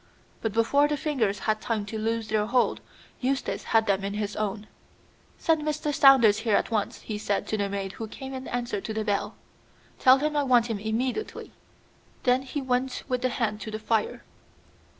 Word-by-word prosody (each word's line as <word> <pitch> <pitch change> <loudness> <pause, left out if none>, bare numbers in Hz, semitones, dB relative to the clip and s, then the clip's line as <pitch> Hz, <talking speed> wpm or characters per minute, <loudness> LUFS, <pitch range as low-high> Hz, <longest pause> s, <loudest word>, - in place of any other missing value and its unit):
But 225 - -1
before 230 +7 +3
the 295 0 -1
fingers 250 -10 0
had 215 -1 +1
time 220 -3 -2
to 220 +2 -5
loose 225 0 -1
their 215 -1 +1
hold, 245 +2 +1 0.4
Eustace 265 +1 -1
had 225 -1 +3
them 195 -1 +1
in 200 +1 -3
his 210 -1 -3
own. 210 0 -3 0.7
"Send 320 -2 +2
Mr. 300 0 -2
Saunders 255 -7 +6
here 220 -2 +1
at - - 0
once," 215 -3 -1
he 210 -2 -5
said 205 -1 -1
to - - 0
the 200 -1 -1
maid 195 -1 -3
who 220 +2 -6
came 265 +4 -8
in 260 0 -6
answer 240 -4 -2
to 220 - -5
the 220 -1 -1
bell. 205 -2 -1 0.6
"Tell 260 +1 +7
him 300 +2 -1
I 290 - +3
want 245 -4 +3
him 210 - -2
immediately." 245 - -3 0.7
Then 250 0 +3
he 270 +1 -5
went 255 0 -1
with 250 -2 -1
the 255 - +1
hand 220 -3 -2
to - - -5
the 215 - -4
fire. 220 0 -1
225 Hz, 195 wpm, -27 LUFS, 215-260 Hz, 0.7 s, Tell